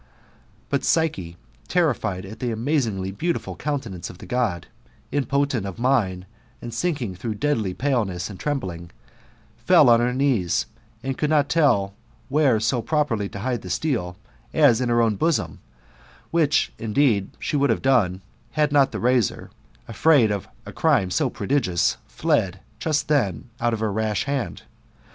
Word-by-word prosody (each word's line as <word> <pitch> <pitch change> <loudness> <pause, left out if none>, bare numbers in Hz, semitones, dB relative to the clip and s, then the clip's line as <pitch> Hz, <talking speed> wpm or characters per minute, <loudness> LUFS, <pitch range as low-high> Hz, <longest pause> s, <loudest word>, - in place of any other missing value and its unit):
* - - -33
But 140 - 0
Psyche, 95 - 0 0.3
terrified 120 - 0
at 110 +3 -10
the 125 - -2
amaaiingly 110 -6 -1
beautiful 170 +8 -2
countenance 125 - -4
of 90 - -11
the - - -11
God, 115 -9 -1 0.5
impotent 140 -3 0
of 100 - -7
mind, 115 -8 +1 0.5
sinking 125 - -2
through 110 +4 -4
deadly 110 -7 -1
paleness, 110 -10 -1
and 100 -3 -10
trembling, 90 - -3 0.7
fell 120 - +5
on 115 - +6
her 120 +1 +1
knees, 125 -9 +1 0.4
and 135 0 -3
could 150 - +1
not 150 -2 +3
tdl 125 -12 +3 0.4
where 140 -5 +3
sq 115 +2 0
properly 120 -8 0
to 100 - -7
hide 125 -1 -2
the 90 - -9
steel, 90 - -1 0.4
as 135 -6 +5
in 125 - 0
her 120 0 +3
own 110 -3 +1
bosoni, 135 - 0 0.7
which, 155 -3 +2
indexed,* 110 -3 +1
she 155 - -3
would 140 -1 +2
have 115 - 0
done, 105 -9 +2 0.3
had 150 -1 +2
not 140 -2 +4
the - - -4
razor, 125 -4 +1 0.4
afraid 115 0 +4
of 100 -2 -3 0.2
a - - -8
crime 95 -2 +2
so - - +1
prodigious, 100 -12 0
fled 110 - 0 0.2
just 155 +1 0
then 125 - 0
out 120 - +1
of 110 -1 -2
her 110 -2 0
rash 105 -1 -1
hand. 140 -4 -3
120 Hz, 155 wpm, -23 LUFS, 100-145 Hz, 0.7 s, on